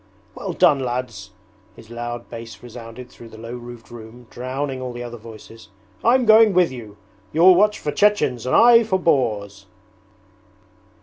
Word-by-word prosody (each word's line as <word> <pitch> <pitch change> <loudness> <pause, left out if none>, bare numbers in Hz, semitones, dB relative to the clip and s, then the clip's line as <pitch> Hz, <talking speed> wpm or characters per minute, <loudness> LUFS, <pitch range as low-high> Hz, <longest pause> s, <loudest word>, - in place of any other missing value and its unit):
'Well, 190 -4 -6
lads,' 125 - 0 0.5
his 115 0 -16
loud 120 0 -6
bass 115 -2 -10
resounded 120 +1 -11
through 115 - -14
the 110 - -14
low 115 +1 -9
roofed 120 -1 -12
room 120 +1 -12
drowning 130 +2 -5
all 125 -1 -6
the 120 0 -7
other 120 0 -8
voices, 110 0 -14 0.3
'I'm 250 +2 +3
going 220 -1 +6
with 180 -6 +3
you. 110 -5 -11 0.3
You'll 175 +4 +6
watch 210 +3 +2
for 150 - -4
Chechens 145 - +1
and - - +1
I 235 0 +7
for 195 -4 -1
boars!' 105 - -1
125 Hz, 150 wpm, -21 LUFS, 115-170 Hz, 0.5 s, I